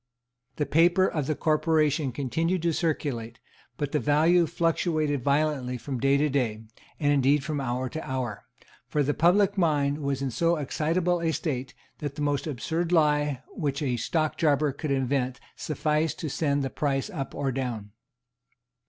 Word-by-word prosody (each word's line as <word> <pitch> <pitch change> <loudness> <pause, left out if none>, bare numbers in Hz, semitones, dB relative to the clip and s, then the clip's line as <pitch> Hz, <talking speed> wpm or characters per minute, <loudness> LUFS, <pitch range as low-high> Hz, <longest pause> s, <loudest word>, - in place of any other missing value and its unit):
The 150 - -1
paper 175 +5 +4
of 150 -7 -1
the 155 - 0
Corporation 155 -2 +1
continued 160 +8 -1
to 170 -1 +2
circulate, 130 -9 -2 0.4
but 145 -1 -2
the 150 - +1
value 160 +4 +3
fluctuated 155 -3 0
violently 140 -3 +1
from 125 +2 -5
day 135 +2 +3
to 150 +2 +2
day, 120 -6 -1 0.4
and 145 -2 +3
indeed 140 +1 +3
from 145 0 -2
hour 130 0 -2
to 160 +5 -5
hour; 125 -5 -4 0.4
for 150 - +1
the 145 +2 +1
public 195 +6 +3
mind 145 -4 +2
was 140 -2 -2
in 135 - -1
so 170 +7 +2
excitable 165 +4 0
a 165 -1 +1
state 135 -5 -3 0.2
that 145 -2 -4
the 150 - -3
most 145 +1 0
absurd 160 +6 -2
lie 150 -5 +2
which 140 -1 -3
a 130 -3 0
stockjobber 150 +1 +1
could 155 - -4
invent 130 -1 0 0.2
sufficed 155 +1 -1
to 155 - -3
send 140 -1 0
the 135 - -3
price 140 +6 -1
up 140 -8 -5
or 140 -2 -1
down. 120 -6 -4
145 Hz, 160 wpm, -27 LUFS, 135-160 Hz, 0.4 s, paper